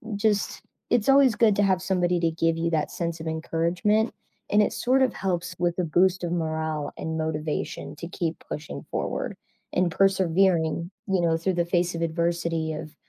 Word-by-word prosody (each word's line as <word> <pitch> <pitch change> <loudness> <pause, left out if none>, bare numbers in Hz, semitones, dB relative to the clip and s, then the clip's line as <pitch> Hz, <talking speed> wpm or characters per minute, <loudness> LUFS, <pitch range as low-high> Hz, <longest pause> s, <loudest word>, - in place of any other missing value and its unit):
just, 205 0 0 0.3
it's 235 +1 +2
always 270 -4 +6
good 215 -3 +4
to 205 - +4
have 190 -2 +2
somebody 180 -2 +1
to 165 - +2
give 165 0 +1
you 170 +1 0
that 155 -2 0
sense 170 -1 -3
of 160 - -6
encouragement, 170 +7 0 0.4
and 210 - +4
it 210 - +2
sort 260 +2 +2
of 260 - +3
helps 180 -1 -2
with 175 -1 +1
the 180 - +1
boost 180 +3 +2
of 170 - -2
morale 160 -3 -2
and 160 0 -3
motivation 155 -1 -3
to 170 +3 -7
keep 170 -3 -2
pushing 150 0 -6
forward - - -2 0.4
and 180 -1 +2
persevering, 180 -3 +2 0.2
you 190 -2 +1
know, 165 -1 +2
through 185 +3 0
the 175 0 +1
face 175 0 0
of 165 - -4
adversity 165 -1 -1
of 155 0 -7
170 Hz, 185 wpm, -26 LUFS, 160-190 Hz, 0.4 s, always